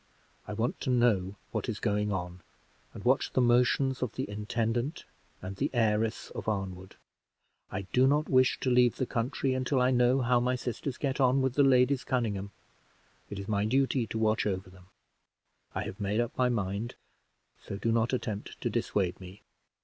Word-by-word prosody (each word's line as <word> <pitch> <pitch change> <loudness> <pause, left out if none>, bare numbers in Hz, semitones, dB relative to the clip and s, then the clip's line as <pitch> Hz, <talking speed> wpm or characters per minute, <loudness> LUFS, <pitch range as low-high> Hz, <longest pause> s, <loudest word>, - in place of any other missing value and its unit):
I 105 - -4
want 115 +4 -2
to - - -2
know 110 -6 +2 0.2
what - - -2
is 110 - -2
going 105 -1 0
on, 90 -2 -4 0.5
and - - -10
watch - - +2
the - - +2
motions 125 +2 +3
of 125 -4 -2
the - - -3
intendant 115 +7 -2 0.4
and 95 +1 -5
the - - 0
heiress 110 -1 +1
of - - -6
Arnwood. 95 -3 -4 0.7
I 95 - -3
also 95 - -12
do 130 +1 +5
not 150 +2 +2
wish 130 -1 +3
to 130 - +1
leave 125 -1 +4
the 130 - -1
country 130 +3 -1
until 130 +1 0
I 125 +1 +3
know 125 +1 +3
how 120 0 +3
my 125 +1 +1
sisters 125 +1 -4
get 140 0 -1
on 130 +1 +4
with 130 -2 +1
the 145 - +3
Ladies 130 0 +4
Conynghame: 105 -6 -1 0.8
it 100 - -6
is 100 0 -6
my 100 -1 +1
duty 130 +1 +1
to 110 - -4
watch 110 -1 +1
over 95 -2 -3
them. 90 -1 -17 0.9
I - - -1
have 95 - -7
made 100 +2 0
up 120 +1 -1
my 125 -1 +2
mind, 105 0 -2 0.7
so 100 - -6
do 115 +3 0
not 115 +1 +2
attempt 110 -5 -4
to - - -1
dissuade 95 -3 -1
me." 95 +2 -12
115 Hz, 190 wpm, -30 LUFS, 100-130 Hz, 0.9 s, do